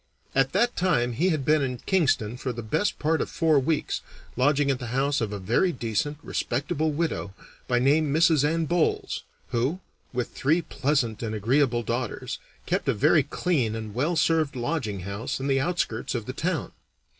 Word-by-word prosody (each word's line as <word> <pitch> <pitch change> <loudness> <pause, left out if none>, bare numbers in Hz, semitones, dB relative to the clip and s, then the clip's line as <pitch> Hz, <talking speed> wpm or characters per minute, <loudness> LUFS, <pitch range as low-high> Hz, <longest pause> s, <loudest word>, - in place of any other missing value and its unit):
At 135 0 +2
that 240 +1 +2
time 125 -10 +1
he 170 +11 +2
had 155 -6 0
been 155 0 +4
in 130 -2 -1
Kingston 135 - +1
for 125 +1 -3
the 120 -1 -6
best 200 - 0
part 160 +1 +1
of - - -2
four 160 -3 +3
weeks, 150 +3 -1 0.3
lodging 140 +2 +3
at 130 - -2
the 120 - -5
house 135 +3 +1
of 110 -2 -1
a 105 - -3
very 115 - +2
decent, 120 +3 -2
respectable 155 +5 -1
widow, 150 - -2 0.3
by 125 - +2
name 145 +4 +3
Mrs. 160 -1 +4
Anne 160 +2 +1
Bolles, 170 0 0 0.3
who, 130 +9 0 0.3
with 125 -1 -2
three 160 +6 +1
pleasant 130 -9 0
and 110 -2 -3
agreeable 120 +2 +2
daughters, 120 0 -3 0.3
kept - - 0
a - - +2
very 150 +7 +5
clean 140 -5 0
and 110 -2 -6
well 150 +9 0
served 155 -2 +2
lodging 120 - -2
house 100 +10 -4
in 135 - -4
the 135 -1 +2
outskirts 135 -8 -1
of 115 -3 -3
the 130 - -5
town. 165 +3 -2
135 Hz, 180 wpm, -26 LUFS, 120-155 Hz, 0.3 s, very